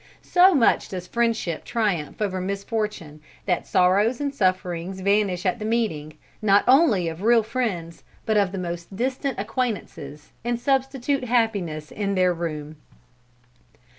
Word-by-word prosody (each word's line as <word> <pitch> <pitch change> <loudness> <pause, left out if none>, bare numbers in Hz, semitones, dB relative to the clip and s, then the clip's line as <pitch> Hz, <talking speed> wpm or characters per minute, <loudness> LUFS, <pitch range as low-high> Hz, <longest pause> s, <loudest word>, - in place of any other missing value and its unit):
So 365 0 +5
much 245 -5 +3
does 180 -2 -5
friendship 230 -6 -1
triumph 210 -6 -1
over 190 -2 -2
misfortune, 200 -5 -4 0.2
that 180 -3 -1
sorrows 200 +7 +3
and 285 -1 -2
sufferings 185 -4 -1
vanish 200 -2 +1
at 185 +5 0
the - - -5
meeting, 215 -10 -1 0.3
not 205 -1 +4
only 250 - +4
of 165 +2 -5
real 230 +1 +4
friends, 210 -8 -3 0.2
but 220 - +1
of 200 -3 +2
the 195 - -5
most 175 +1 -5
distant 260 +3 -2
acquaintances, 210 - -4
and 240 0 -1
substitute 270 0 0
happiness 200 -11 -1
in 200 -1 -2
their 185 -1 +3
room." 155 -3 -5
200 Hz, 135 wpm, -24 LUFS, 180-235 Hz, 0.3 s, So